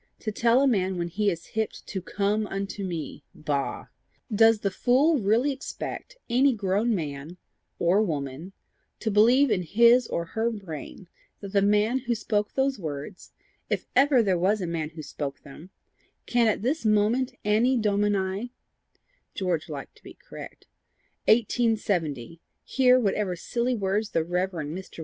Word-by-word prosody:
To 215 - -3
tell 235 +5 +3
a - - +4
man 190 -6 +1
when 170 0 -2
he 205 +4 +1
is 170 -3 -5
hipped 220 -1 -3
to 190 - -5
COME 205 +3 -1
UNTO 195 +1 -4
ME! 170 -5 -5
Bah! 145 -2 -3 0.5
Does 225 0 +5
the 200 - 0
fool 270 - +3
really 225 +7 +2
expect 285 - -7
any 260 +2 +3
grown 205 +3 0
man 150 0 -5 0.4
or 180 +4 +3
woman 155 -1 -4 0.5
to 220 - -2
believe 240 +6 +5
in 195 -4 +2
his 235 +7 +4
or 170 - -2
her 225 +1 +1
brain 190 -4 -8 0.3
that 200 -1 -9
the 200 - +4
man 210 +5 +2
who 240 -2 -2
spoke 210 -1 -1
those 265 -2 +1
words, 155 +2 -7 0.4
if - - -1
ever 265 -2 +5
there 190 -4 +1
was 200 +4 +2
a 185 - -2
man 165 -3 -3
who 160 -1 -9
spoke 140 -1 -6
them, 150 +6 -13 0.6
can 240 -1 +2
at 215 -1 0
this 285 +7 0
moment 220 +4 +2
anni 230 +5 +3
domini" 205 0 0 0.8
George 175 -5 -2
liked 140 -3 -7
to - - -24
be - - -12
correct - - -11 0.6
"1870, 195 - +1 0.2
hear 255 -1 +4
whatever 200 -4 0
silly 240 +7 -1
words 205 +1 -1
the 165 - 0
Rev. 180 +3 -1
Mr. 170 +1 -7
205 Hz, 155 wpm, -26 LUFS, 175-235 Hz, 0.8 s, Does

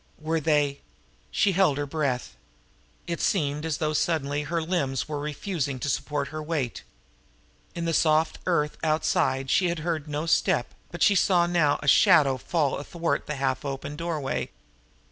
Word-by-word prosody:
Were 160 +1 -1
they 145 -2 +1 0.5
She 200 - +2
held 180 -6 +3
her 145 - -1
breath. 135 - -2 0.7
It 170 -1 -3
seemed 150 -4 0
as 155 -3 -1
though 155 -2 -1
suddenly 145 -2 0
her 165 +3 -2
limbs 140 - -1
were 150 -1 -3
refusing 150 -1 -3
to 140 - -3
support 140 +1 -2
her 155 0 -5
weight. 150 -7 -3 0.9
In 170 -1 -3
the 165 - 0
soft 155 0 +2
earth 150 -4 +1
outside 155 -4 +1
she 185 -2 +3
had 170 - -2
heard 160 -3 -2
no 150 +1 -3
step, 165 - +1 0.2
but - - -2
she 205 - +6
saw 180 -2 +3
now 165 -4 +2
a - - -5
shadow 140 -1 +5
fall 145 +1 -1
athwart 170 +3 -2
the 150 - -3
half 130 -1 -1
open 140 +1 -5
door 165 0 -3
way. 135 -2 -3
150 Hz, 165 wpm, -26 LUFS, 140-165 Hz, 0.9 s, she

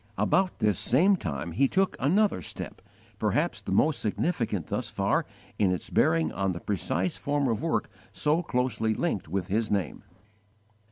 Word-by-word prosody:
About 190 -1 +2
this 105 -4 +1
same 180 +11 +4
time 80 - -4
he 135 +12 +3
took 190 +6 +1
another 190 - +2
step - - -7 0.4
perhaps - - 0
the - - -6
most 150 -5 +3
significant 110 - -1
thus - - -3
far - - 0 0.3
in 100 -3 +3
its 90 - -3
bearing 80 -1 +3
on 95 +1 -1
the 85 - -6
precise 95 -1 -1
form 145 -1 0
of 115 -1 0
work 165 0 0 0.2
so 155 +3 +1
closely 125 -7 0
linked 105 - -1
with 95 +2 -2
his 105 +4 -1
name. 100 -6 -2
110 Hz, 160 wpm, -28 LUFS, 90-150 Hz, 0.4 s, same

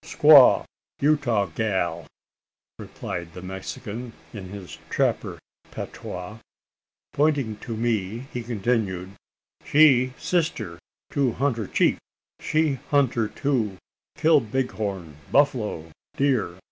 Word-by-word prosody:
"Squaw 150 -4 +7 0.3
Utah 140 -8 +2
gal," 85 -4 -2 0.7
replied 85 -1 -6
the 90 - -7
Mexican 105 +5 -6 0.2
in 95 -4 -8
his 100 -2 -9
trapper - - 0 0.3
patois. 90 +5 -7 0.7
Pointing 140 -7 +1
to 115 +1 -6
me, 115 0 -1
he 125 - -3
continued: 105 -5 -1 0.5
"She 130 -4 +5
sister 165 - -1 0.3
to 135 -5 +1
hunter 120 -6 -1
chief - - +2 0.4
she 155 -4 +1
hunter 130 -6 +2
too 115 -6 -1 0.4
kill 160 -1 +5
bighorn, 105 - -3
buffalo, 110 - +1 0.3
deer. 130 -11 +1
115 Hz, 95 wpm, -24 LUFS, 95-140 Hz, 0.7 s, Squaw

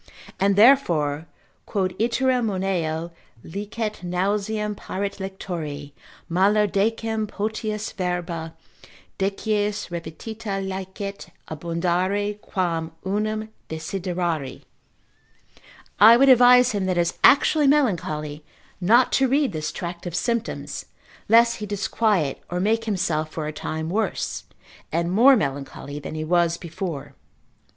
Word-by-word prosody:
And 195 0 +3
therefore 170 - +4 0.4
(quod 185 -3 -1
iterum 250 +1 +1
moneo, 175 -4 -2 0.3
licet 210 +4 -5
nauseam 205 +4 -1
paret 200 0 -5
lectori, 165 -7 -5 0.4
malo 200 +5 +3
decem 220 +2 0
potius 215 +1 -3
verba, 175 -3 -3 0.6
decies 205 0 -1
repetita 195 +5 -5
licet 190 +1 -6 0.2
abundare, 180 +6 -1
quam 170 -6 -2
unum 215 +2 -1 0.2
desiderari) 170 -3 -3 1.4
I 225 +4 +9
would 275 +2 +5
advise 250 0 +7
him 200 -3 -1
that 185 -1 0
is 170 0 0
actually 290 +1 +5
melancholy 155 - 0 0.4
not 235 +8 +4
to 265 - +3
read 275 0 +2
this 155 -3 -3
tract 175 0 -6
of 170 - -5
Symptoms, 235 +4 -2 0.4
lest 230 +1 +5
he 210 - -6
disquiet 200 - 0
or 180 - -2
make 225 +4 +1
himself 175 -7 -1
for 155 - -4
a 155 - -4
time 160 +1 -4
worse, 200 +3 -2 0.5
and 170 +2 0
more 250 +8 +7
melancholy 145 - -4
than 150 - -7
he 155 - -3
was 170 +1 +2
before. 170 -3 -6
195 Hz, 110 wpm, -23 LUFS, 170-215 Hz, 1.4 s, I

